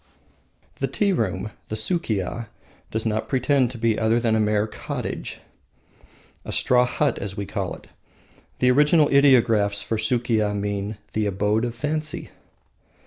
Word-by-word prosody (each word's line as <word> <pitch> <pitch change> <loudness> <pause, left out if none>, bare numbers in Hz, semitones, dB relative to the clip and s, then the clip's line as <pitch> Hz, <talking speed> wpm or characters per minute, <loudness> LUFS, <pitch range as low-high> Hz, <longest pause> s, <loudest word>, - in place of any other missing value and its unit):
The 135 - -1
tea 195 +9 +1
room 105 - -2 0.2
(the 110 - -4
Sukiya) 110 - -1 0.4
does 110 +1 -2
not 110 -1 -1
pretend 130 -1 +2
to 125 - -8
be 115 -1 +1
other 115 +1 +2
than 115 -2 +1
a - - +2
mere 105 0 +2
cottage 110 - -5 1.0
a - - -6
straw 125 0 +3
hut, 140 +1 0
as 100 0 -6
we 100 - -3
call 100 -2 -3
it. - - -15 0.7
The 125 0 +4
original 150 +3 +4
ideographs 115 -7 +4
for 110 - -2
Sukiya 110 -2 +1
mean 100 +1 -3 0.2
the 110 -1 0
Abode 105 +3 +1
of 120 -1 -4
Fancy. 155 +3 -3
110 Hz, 145 wpm, -23 LUFS, 105-130 Hz, 1.0 s, The